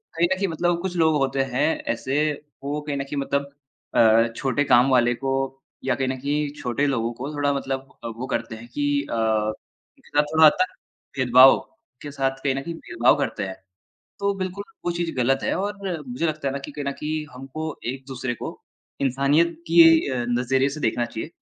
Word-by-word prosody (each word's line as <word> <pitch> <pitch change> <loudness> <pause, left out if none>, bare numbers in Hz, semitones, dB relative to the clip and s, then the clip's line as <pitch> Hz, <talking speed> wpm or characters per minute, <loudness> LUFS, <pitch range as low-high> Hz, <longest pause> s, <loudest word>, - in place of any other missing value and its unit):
कहीं 170 +1 +3
न - - -2
कहीं 195 +1 0
मतलब 170 +1 0
कुछ 185 -1 -3
लोग 160 -2 +4
होते 135 0 +1
हैं 140 +4 +2 0.3
ऐसे, 145 +6 0 0.3
वो 145 +2 -2
कहीं 145 -1 -3
न 140 - -2
कहीं 140 +1 -6
मतलब 140 0 -2 0.4
अ, 115 +1 +6
छोटे 135 +2 0
काम 125 0 +5
वाले 120 -1 +4
को 135 +3 -3 0.5
या 130 -2 +1
कहीं 135 0 -1
न 130 - -1
कहीं 145 +2 -1
छोटे 125 +4 0
लोगों 120 -4 0
को 135 +6 -6
थोड़ा 145 -1 +1
मतलब 135 -1 -4
अ, - - -4
वो 115 +3 -6
करते 115 -3 -3
हैं 115 +2 -11
कि 145 - -1 0.3
अ, - - -1
उनके 110 -1 -3
साथ 145 0 +3
थोड़ा 160 0 +7
हद 150 - +9
तक 185 - 0 0.4
भेदभाव 130 +1 +7 0.4
के 145 - -7
साथ 135 -1 -1
कहीं 135 -2 +1
न 135 - -2
कहीं 170 +4 -5
भेदभाव 120 -4 +2
करते 135 -7 -2
हैं। 95 -1 -5 0.6
तो 200 0 +1
बिल्कुल 190 +1 -4 0.2
वो 175 - +1
चीज़ 170 -1 -2
ग़लत 130 +2 +2
है - - +1
और 205 +2 -2 0.3
मुझे 125 +7 -2
लगता 155 -2 -2
है 135 - 0
ना - - -2
कि - - -7
कहीं 145 -1 -6
न 140 - 0
कहीं 155 +2 -3
हमको 135 +4 -7 0.3
एक-दूसरे 130 -1 -5
को - - -5 0.5
इंसानियत 140 +6 +2
कि 165 +1 +8 0.3
अ, 125 -2 -1
नज़रिए 130 +3 +2
से 150 +2 -6
देखना 120 -2 0
चाहिए। 120 +7 -6
135 Hz, 205 wpm, -24 LUFS, 125-150 Hz, 0.6 s, हद